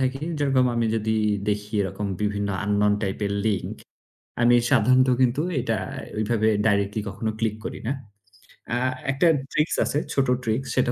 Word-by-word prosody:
থাকি। 130 +1 -1 0.2
যেরকম 135 -3 +3
আমি 115 -1 +1
যদি 110 0 0 0.3
দেখি 105 0 -2
এরকম 100 +2 -4 0.2
বিভিন্ন 105 -1 -1 0.2
unknown 105 0 +2
type 95 0 -2
এর 100 - -2
link, 105 -3 -1 0.7
আমি 120 0 +5 0.2
সাধারণত 130 +1 +4
কিন্তু 130 +3 +3 0.2
এটা - - -1 0.4
ওইভাবে 110 0 +1 0.2
directly 100 0 +1
কখনো 110 +2 -3
click 110 -1 -1
করি - - -5
না। 130 - +1 0.8
আ - - +1 0.3
একটা 140 +6 +2 0.2
tricks 150 +2 +1
আছে, - - -1 0.2
ছোট 135 -1 +1 0.2
tricks, 115 +3 -1
সেটা 125 -2 +2
110 Hz, 155 wpm, -24 LUFS, 105-130 Hz, 0.8 s, আমি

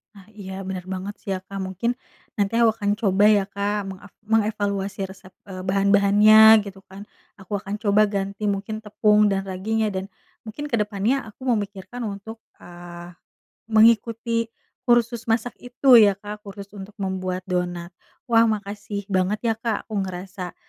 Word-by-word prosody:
Ah, 195 -2 -15
iya 195 -2 -8
benar 185 -1 -5
banget 190 +2 -5
sih - - -9
ya - - -1
Kak, 195 -1 -6
mungkin 190 +6 -2 0.4
nanti 205 +1 -1
aku 230 -2 +4
akan 205 -2 -1
coba 200 -3 +2
ya 205 -2 +3
Kak, 200 +1 -2
mengak 195 +1 -9 0.2
mengevaluasi 205 -2 -1
resep, 190 0 -13 0.2
eee, 185 -2 -8
bahan-bahannya 205 +3 +6
gitu 195 -1 -10
kan, 195 +2 -10 0.3
aku 195 +1 -5
akan 205 +1 -5
coba 210 -1 +2
ganti 200 +1 -2
mungkin 205 +2 -3
tepung 210 0 +3
dan 195 0 -1
raginya 215 +4 -1
dan, 190 +1 -4 0.3
mungkin 230 +7 -7
kedepannya 225 0 0
aku 255 +5 -13
memikirkan 205 +3 -5
untuk, 220 +3 -9 0.2
eee, 175 0 -11 0.5
mengikuti 230 +1 +3 0.4
kursus 235 -1 +2
masak 230 +1 -1
itu 250 0 +5
ya 205 -2 +6
Kak, 210 +1 -10
kursus 200 0 -9
untuk 200 0 -10
membuat 185 -1 -3
donat. 175 -1 -2 0.4
Wah 230 0 +5
makasih 205 -1 -4
banget 190 +2 +1
ya - - +1
Kak, 230 -2 -3
aku 215 - -5
ngerasa, 185 0 -7
205 Hz, 155 wpm, -23 LUFS, 195-220 Hz, 0.5 s, bahan-bahannya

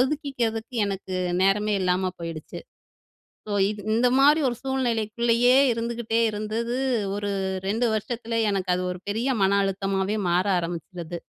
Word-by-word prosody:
ஒதுக்கிக்கிறதுக்கு 255 -5 -1
எனக்கு 195 -1 -4 0.3
நேரமே 210 +2 +2
இல்லாம 185 0 +1
போயிடுச்சு. 165 -2 -6 0.9
ஸோ 205 - -1 0.2
க் 205 - -9
இந்த 235 +3 +3
மாரி 295 +3 +6
ஒரு 245 - -1
சூழ்நிலைக்குள்ளேயே 240 -2 +1 0.2
இருந்துகிட்டே 230 0 -2
இருந்தது. 220 +3 -3 0.4
ஒரு 205 0 -3 0.4
2 225 +4 +1
வருஷத்துல 230 +1 -2
எனக்கு 190 -2 -2
அது 180 - -2
ஒரு 180 - -6
பெரிய 235 +5 0
மன 195 +1 +3
அழுத்தமாவே 195 +1 -1
மாற 180 +3 +2
ஆரம்பிச்சுது. 170 0 -6
215 Hz, 125 wpm, -25 LUFS, 190-235 Hz, 0.9 s, மாரி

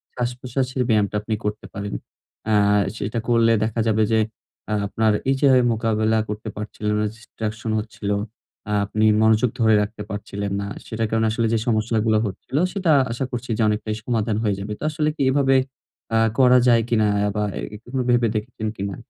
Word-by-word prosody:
শ্বাসপ্রশ্বাসের 125 +1 -2
ব্যায়ামটা 105 -2 +2
আপনি 110 +1 -2
করতে 105 +1 -3
পারেন। 100 0 -5 0.6
আ - - +4 0.4
সেটা 105 +3 -2
করলে 115 -1 +4
দেখা 110 +1 -2
যাবে 110 0 +3
যে 110 - +4 0.5
আ - - +1
আপনার 110 +1 +1 0.2
এই 135 - +3
যে 140 - +5 0.2
মোকাবেলা 110 0 +1
করতে 105 +1 -5
পারছিলো 105 0 -3
না, 105 - +1
distraction 110 0 -6
হচ্ছিল। 105 -1 -6 0.6
আ - - +1
আপনি 110 +2 0 0.2
মনোযোগ 110 +2 +4
ধরে 110 -1 +5
রাখতে 105 +1 -4
পারছিলেন 100 0 -4
না। 100 - -4 0.2
সেটার 110 0 -2
কারণ 110 0 +1
আসলে 115 0 0
যে 115 - +2
সমস্যাগুলা 110 -1 +2
হচ্ছিল 105 +7 -4 0.2
সেটা 185 -5 +1 0.2
আশা 125 +3 -2
করছি 120 0 -5
যে - - 0
অনেকটাই 105 0 -2
সমাধান 110 -3 0
হয়ে 105 -3 +1
যাবে। 105 +2 -4
তো - - -8
আসলে 150 0 0
কি - - -5
এভাবে 135 -1 +3 0.6
আ - - +5 0.2
করা 125 -1 +7
যায় 120 -2 +5
কিনা 110 -2 +3
অ্যা 105 0 +1
বা 105 - 0
অ্যা - - -5 0.3
এভাবে 130 0 -2
ভেবে 120 -1 +3
দেখেছেন 110 0 -3
কিনা? 100 0 -3
110 Hz, 180 wpm, -22 LUFS, 105-120 Hz, 0.6 s, করা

